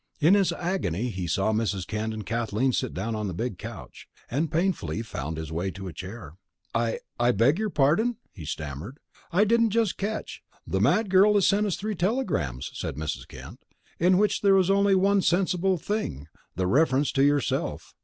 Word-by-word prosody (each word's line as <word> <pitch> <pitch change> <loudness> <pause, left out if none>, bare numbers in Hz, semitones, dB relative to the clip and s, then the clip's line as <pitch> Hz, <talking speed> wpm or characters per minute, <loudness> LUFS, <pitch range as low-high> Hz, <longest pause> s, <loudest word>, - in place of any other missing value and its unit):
In 160 +5 +5
his 200 -2 +3
agony 125 - -2
he 95 -5 -4
saw 95 +5 +1
Mrs. 105 -4 -1
Kent 110 +2 -3
and 110 -1 -6
Kathleen 115 +2 0
sit 130 -1 -1
down 110 +5 -3
on 105 -1 -2
the 90 - -4
big 115 -2 -3
couch, - - -9 0.2
and 150 +5 0
painfully 160 - -1
found 80 -7 -5
his 80 -1 -6
way 85 +4 -2
to 95 +2 -7
a 90 - -7
chair. 90 -1 -9 0.4
"I 115 -1 0 0.2
I 120 +1 +4
beg 125 - +3
your 215 -1 0
pardon?" 200 - +2
he 85 - -10
stammered. 75 - -6 0.3
"I 185 +5 +4
didn't 230 +1 +3
just 225 -2 0
catch 215 +2 -4
" - - -34
"The - - -1
mad 215 -3 +2
girl 200 +2 +6
has 200 - +4
sent 205 +1 +3
us 190 - 0
three 215 +2 -3
telegrams," 175 - -1
said - - -4
Mrs. 75 -5 -4
Kent, - - -11 0.4
"in 180 +2 +4
which 210 0 +2
there 200 -1 +5
was 190 0 +3
only 200 0 +4
one 195 +1 +3
sensible 185 +1 +1
thing, 160 - -3 0.3
the 95 +1 0
reference 135 - +2
to 135 - +2
yourself. 145 0 0
135 Hz, 195 wpm, -26 LUFS, -, 0.4 s, girl